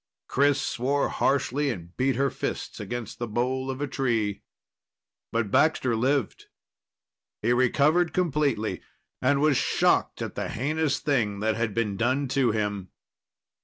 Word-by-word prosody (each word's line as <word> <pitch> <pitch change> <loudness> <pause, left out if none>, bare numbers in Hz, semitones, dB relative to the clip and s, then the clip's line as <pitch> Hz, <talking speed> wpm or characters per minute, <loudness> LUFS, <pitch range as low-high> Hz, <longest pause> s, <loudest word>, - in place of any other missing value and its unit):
Chris 140 +1 +3
swore 135 +2 0
harshly 140 +1 +1
and 85 -7 -6
beat 130 0 +1
her 140 +2 +1
fists - - -4
against 120 -3 -5
the 120 - -2
bole 130 +4 -1
of 135 +1 -4
a 145 - -1
tree. 115 -7 -1 0.9
But 115 -3 -1
Baxter 130 -5 +3
lived. 130 +1 0 1.0
He 120 - +3
recovered 145 +7 +3
completely, 145 -10 0 0.4
and 140 +2 +3
was 150 -3 +4
shocked - - +1
at - - -5
the - - -3
heinous 150 +3 0
thing 110 -9 0
that 110 0 +1
had 115 -3 -2
been 105 -4 -1
done 130 +4 +1
to 130 -2 +2
him. 105 -3 -2
130 Hz, 140 wpm, -26 LUFS, 115-140 Hz, 1.0 s, was